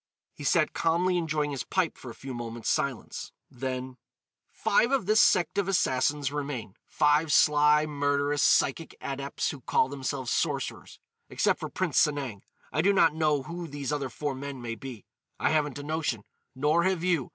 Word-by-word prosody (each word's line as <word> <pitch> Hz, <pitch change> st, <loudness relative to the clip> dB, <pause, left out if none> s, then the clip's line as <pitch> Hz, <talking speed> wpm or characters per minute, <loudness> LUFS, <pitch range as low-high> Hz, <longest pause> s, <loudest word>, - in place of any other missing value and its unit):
He -, -, -10 dB
sat 155 Hz, +3 st, +2 dB
calmly 175 Hz, +3 st, +1 dB
enjoying 155 Hz, -3 st, 0 dB
his 135 Hz, -4 st, -3 dB
pipe 185 Hz, -4 st, 0 dB
for 130 Hz, -, -10 dB
a 115 Hz, -, -9 dB
few 135 Hz, -1 st, -7 dB
moments' 120 Hz, -1 st, -3 dB
silence, 140 Hz, -6 st, -3 dB, 0.2 s
then: 130 Hz, 0 st, -5 dB, 0.5 s
"Five 235 Hz, -, +2 dB
of 270 Hz, -8 st, +1 dB
this 215 Hz, +3 st, +5 dB
sect 175 Hz, -2 st, +3 dB
of 195 Hz, -, 0 dB
Assassins 145 Hz, -5 st, +1 dB
remain—five 145 Hz, +3 st, 0 dB
sly, 150 Hz, 0 st, +5 dB
murderous, 145 Hz, -1 st, 0 dB
psychic 160 Hz, +4 st, +2 dB
adepts 140 Hz, 0 st, -3 dB
who 140 Hz, -, -10 dB
call 130 Hz, -, +2 dB
themselves 135 Hz, -2 st, -3 dB
sorcerers. -, -, -2 dB, 0.3 s
Except -, -, +1 dB
for -, -, -5 dB
Prince -, -, 0 dB
Sanang, 135 Hz, -9 st, -2 dB, 0.3 s
I 155 Hz, -, +2 dB
do 195 Hz, +4 st, +4 dB
not 165 Hz, -5 st, +4 dB
know 150 Hz, -3 st, +1 dB
who 170 Hz, +3 st, -6 dB
these 145 Hz, -2 st, -4 dB
other 140 Hz, -3 st, -2 dB
four 145 Hz, +3 st, -3 dB
men 135 Hz, 0 st, -6 dB
may 120 Hz, -1 st, -4 dB
be. 120 Hz, -1 st, -9 dB, 0.3 s
I -, -, +2 dB
haven't 150 Hz, -3 st, 0 dB
a 145 Hz, -, -6 dB
notion. 150 Hz, -8 st, -2 dB, 0.3 s
Nor 150 Hz, +5 st, +2 dB
have 185 Hz, -3 st, 0 dB
you. 170 Hz, -8 st, +1 dB
145 Hz, 170 wpm, -28 LUFS, 130-160 Hz, 0.5 s, this